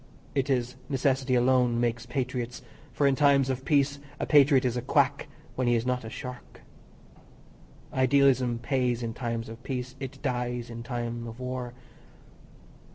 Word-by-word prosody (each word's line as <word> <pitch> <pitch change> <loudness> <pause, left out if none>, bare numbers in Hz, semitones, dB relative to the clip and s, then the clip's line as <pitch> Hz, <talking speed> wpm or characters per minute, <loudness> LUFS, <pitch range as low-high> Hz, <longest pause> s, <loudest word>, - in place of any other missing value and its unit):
It 135 0 0
is 125 -1 0
necessity 135 -1 +1
alone 125 -1 +3
makes 120 0 -1
patriots, 125 -1 -3 0.3
for 145 - 0
in 140 - +5
times 140 -2 +4
of 130 0 -4
peace 140 -1 +2 0.2
a - - -1
patriot 140 -3 +5
is 125 -1 0
a 125 - -1
quack 125 - +1 0.3
when 130 -1 -1
he 120 - +4
is 115 +1 0
not 125 -1 -1
a 110 - -6
shark. 125 +2 -9 1.3
Idealism 130 -2 +3
pays 125 -1 0
in 115 -1 -3
times 115 -2 -3
of 115 +2 -9
peace, 130 0 -4
it 135 -1 -7
dies 125 -2 -2
in 115 0 -6
time 120 -1 -4
of 115 +2 -9
war. 125 -1 -4
125 Hz, 160 wpm, -28 LUFS, 120-135 Hz, 1.3 s, in